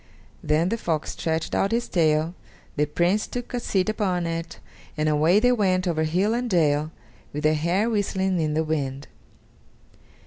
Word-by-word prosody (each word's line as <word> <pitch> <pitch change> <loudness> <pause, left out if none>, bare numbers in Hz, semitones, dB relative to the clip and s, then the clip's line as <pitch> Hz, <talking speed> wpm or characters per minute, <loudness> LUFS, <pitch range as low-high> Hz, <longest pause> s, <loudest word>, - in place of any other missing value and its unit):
Then 160 +4 +2
the 230 - -2
fox 160 -6 -2
stretched 160 0 -2
out 195 - +1
his 235 +1 0
tail, 160 -1 +1 0.4
the 150 0 +1
Prince 175 +7 +1
took 245 0 -6
a 245 - 0
seat 190 -5 0
upon 190 -5 0
it, 165 0 -4 0.4
and 155 0 +1
away 155 +6 +4
they 245 +3 +4
went 190 -5 +1
over 160 -2 0
hill 185 +7 +1
and 245 +1 -1
dale, 155 -5 +2 0.4
with 150 +1 -4
their 155 0 +4
hair 170 +8 +1
whistling 190 -4 0
in 155 -1 0
the 160 - +2
wind. 140 -3 -3
170 Hz, 170 wpm, -24 LUFS, 155-200 Hz, 0.4 s, away